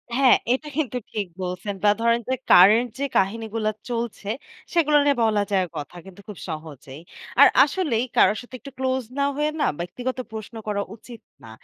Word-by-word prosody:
হ্যাঁ, 265 -1 +6 0.2
এটা 300 +3 -3
কিন্তু 255 -6 -1
ঠিক 205 -3 -3 0.2
বলছেন। 180 +3 -4
বা 205 - +5
ধরেন 235 0 +3
যে - - +2 0.2
কারেন্ট 215 +7 +7
যে 280 - 0
কাহিনীগুলা 220 +2 0 0.2
চলছে, 230 -3 -4 0.4
সেগুলো 305 -3 +4
নিয়ে 285 -1 +3
বলা 215 -2 +2
যায় 190 -2 +2
কথা 150 +4 -7
কিন্তু 195 +1 -13
খুব 210 -4 -9
সহজেই। 155 -2 -8 0.4
আর 285 - +10 0.2
আসলেই 280 -6 0
কারোর 205 +3 +4
সাথে 245 +1 -11
একটু 275 - -11
ক্লোজ 260 -1 -1 0.2
না 280 - +3
হয়ে 300 +1 0
না, - - +3
ব্যক্তিগত 245 +10 -4
প্রশ্ন 220 +1 -8
করা 200 -1 -1
উচিত 230 0 -13 0.2
না। 115 - -11
225 Hz, 175 wpm, -23 LUFS, 195-260 Hz, 0.4 s, আর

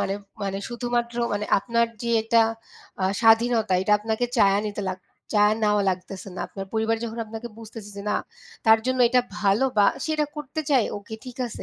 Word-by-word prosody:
মানে, 195 - 0 0.3
মানে 195 0 -2
শুধুমাত্র 240 -1 -2 0.2
মানে 205 +1 -2
আপনার 235 +2 +1 0.2
যে 235 - -1
এটা 230 +1 +4 0.6
আ - - +3 0.2
স্বাধীনতা, 225 -2 +4
এইটা 200 +2 +1
আপনাকে 220 +3 -1
চেয়ে 200 -2 +5
নিতে 205 0 -4
লাগ 185 - -3 0.3
চেয়ে 210 0 +5
নেওয়া 210 -1 +3
লাগতেছে 185 +1 -6
না। - - -6
আপনার 195 -1 -7
পরিবার 220 0 +1
যখন 230 0 -6
আপনাকে 225 +2 -7
বুঝতেছে 220 -2 -10
যে, 200 - -6
না, - - +2 0.5
তার 220 0 +7
জন্য 255 0 0
এটা 250 +1 +4 0.2
ভালো 205 +4 +3
বা 205 - +6 0.2
সে - - -3
এটা 300 - +1
করতে 300 +1 -4
চায়, 260 -5 +4
ওকে, 205 +2 -8
ঠিক 250 -2 -9
আছে 230 - -8
220 Hz, 190 wpm, -24 LUFS, 205-235 Hz, 0.6 s, তার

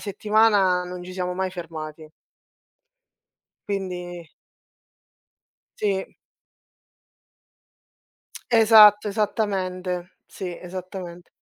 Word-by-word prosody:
settimana 205 -3 +2
non 180 0 -7
ci 185 - -9
siamo 180 -1 -3
mai 190 0 -2
fermati. 155 -3 -8 1.6
Quindi 180 -4 -5 1.5
Sì. 195 -2 -2 2.3
Esatto, 215 -3 +7
esattamente, 185 -4 -2
sì, 180 -2 -7
esattamente. 180 -1 -8
185 Hz, 65 wpm, -24 LUFS, 180-205 Hz, 2.3 s, Esatto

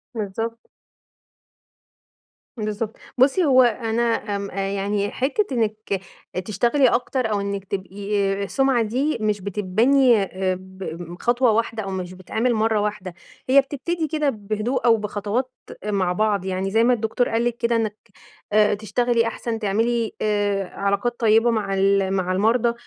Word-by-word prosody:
بالضبط. 225 +2 -4 1.9
بالضبط، 215 0 -3 0.2
بُصي 275 +8 +4
هو 260 -3 +6
أنا 230 -1 0 0.3
آمم 200 0 -4
يعني 200 +1 -2
حتّة 280 +11 0
إنِك 215 -4 -1 0.4
تشتغلي 240 +7 +2
أكتر، 245 -1 0
أو 205 - 0
إنِك 200 -1 -3
تبقي 200 +1 -2
السُمعة 265 +3 +2
دي 260 +8 0
مش 210 -2 0
بتتبني 220 +7 +3
آآ، 185 -1 -2
ب 180 -2 -8
خطوة 240 0 +3
واحدة 225 0 -1
أو 195 - -5
مش 185 -1 -4
بتتعمل 220 +7 -1
مرة 220 -1 +1
واحدة، 205 -3 -3 0.4
هي 275 +2 +7
بتبتدي 315 +4 -3
كده 305 -1 0
بهدوء 215 +3 -2
أو 230 -1 +6
بخطوات 210 +4 -2 0.3
مع 195 -4 0
بعض، 205 -1 0
يعني 190 +1 -2
زي 225 +2 +3
ما 250 +1 +4
الدكتور 230 +1 0
قال 230 +1 0
لِك 240 -1 -1
كده، 235 0 +1
آآ، - - +4
إنِك 215 -2 -2 0.6
آآ، 210 0 +4
تشتغلي 230 +3 +1
أحسن، 230 0 -4
تعملي 225 +2 0
آآ، 205 -2 0
علاقات 200 +5 -1
طيّبة 225 +1 +4
مع 210 -3 -1
ال 195 0 +2
مع 185 -1 0
المرضى، 230 +5 +2
215 Hz, 145 wpm, -22 LUFS, 200-240 Hz, 1.9 s, هي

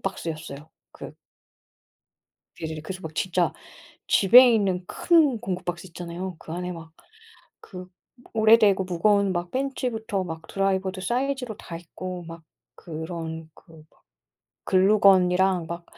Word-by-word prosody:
박스였어요. 160 -5 -6 0.2
그 - - -10 1.5
예예. 160 -1 -5
그래서 185 +4 -7
막 160 -2 -8
진짜 180 0 0 0.5
집에 245 +6 +7
있는 190 -4 0
큰 310 -8 +3
공구 185 -5 -4
박스 175 +1 -5
있잖아요. 175 +1 -7
그 160 - -10
안에 180 +1 -4
막 165 -1 -10 0.7
그 180 -1 -10 0.5
오래되고 215 -3 +5
무거운 200 +2 +2
막 175 0 -3
펜치부터 235 -7 -2
막 160 -1 -8
드라이버도 190 -1 -1
사이즈로 250 +1 -2
다 170 - -9
있고 175 +1 -8
막 165 0 -10 0.3
그런 160 0 -7
그 160 -3 -18
막 - - -32 0.6
글루건이랑 190 -2 +4
막 170 +1 -7
185 Hz, 255 characters per minute, -25 LUFS, 170-200 Hz, 1.5 s, 집에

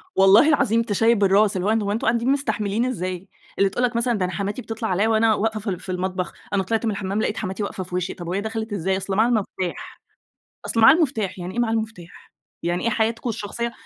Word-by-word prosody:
والله 195 +9 +6
العظيم 230 -6 +3
تشيّب 225 0 +2
الراس 200 +1 +4
اللي 185 - -2
هو - - +3
أن 225 -1 +2
هو 200 - -1
أنتم 220 +2 -2
قاعدين 235 +2 +1
مستحملين 235 -5 0
إزاي؟ 185 -6 -4 0.3
اللي 200 -1 +3
تقول 245 +6 -2
لك 240 -1 +1
مثلًا 235 +1 +1
ده 185 - 0
أنا 180 - -4
حماتي 205 +5 -3
بتطلع 225 0 -4
عليّا 195 +4 +2
وأنا 225 0 +3
واقفة 220 +1 -1
في 210 0 -4
ال 180 -2 -3
في 190 - -7
المطبخ، 185 0 -3 0.2
أنا 195 -1 +2
طلعت 225 +4 -1
من 220 - +1
الحمام 200 +1 -2
لقيت 215 - -1
حماتي 190 +3 -3
واقفة 195 -1 -4
في 180 0 -7
وشّي 180 0 -2
طَب 175 -2 -9
وهي 190 +3 -1
دخلت 220 0 -4
إزاي؟ 190 0 0
أصل 195 0 -3
معاها 220 +4 +4
المفتاح 190 -6 -3 0.7
أصل 230 - 0
معاها 225 +6 +8
المفتاح، 225 - -1
يعني 180 +1 -6
إيه 240 - 0
معاها 225 -2 +1
المفتاح! 220 -6 -5 0.3
يعني 175 +1 -1
إيه 230 - +2
حياتكم 225 +2 -1
الشخصية 230 +2 -4
210 Hz, 235 wpm, -23 LUFS, 190-225 Hz, 0.7 s, معاها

